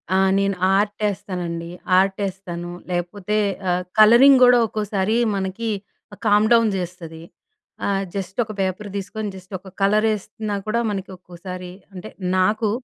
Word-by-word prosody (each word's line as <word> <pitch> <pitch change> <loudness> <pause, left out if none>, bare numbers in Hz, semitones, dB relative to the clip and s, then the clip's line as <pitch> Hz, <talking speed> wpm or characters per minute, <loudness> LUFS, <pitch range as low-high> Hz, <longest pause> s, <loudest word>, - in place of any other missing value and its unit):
ఆ! - - +4 0.2
నేను 195 0 +1 0.2
ఆర్టేస్తానండి. 185 -5 -2 0.3
ఆర్టేస్తాను, 190 -3 -2 0.2
లేకపోతే 180 +4 -2 0.3
ఆహ్, 180 +1 0 0.2
కలరింగ్ 245 +5 +8
కూడా 245 0 +6
ఒక్కోసారి 210 0 -1 0.2
మనకి 195 +4 -3 0.6
కామ్ 210 +1 +4
డౌన్ 230 -1 +4
చేస్తది. 170 -3 -7 0.7
ఆహ్, 195 -1 0
జస్ట్ 190 +1 -5
ఒక 215 - -8
పేపర్ 190 +2 -2
తీసుకొని 210 +2 -4
జస్ట్ 185 +1 -13
ఒక 190 - -17
కలర్ 210 +2 +3
వేస్తున్నా 215 0 -4
కూడా 235 +2 +1
మనకి 195 -1 -5
ఒక్కోసారి 180 0 -9 0.2
అంటే 190 +3 -8 0.3
నాకు 215 +4 +2
195 Hz, 125 wpm, -22 LUFS, 185-215 Hz, 0.7 s, కలరింగ్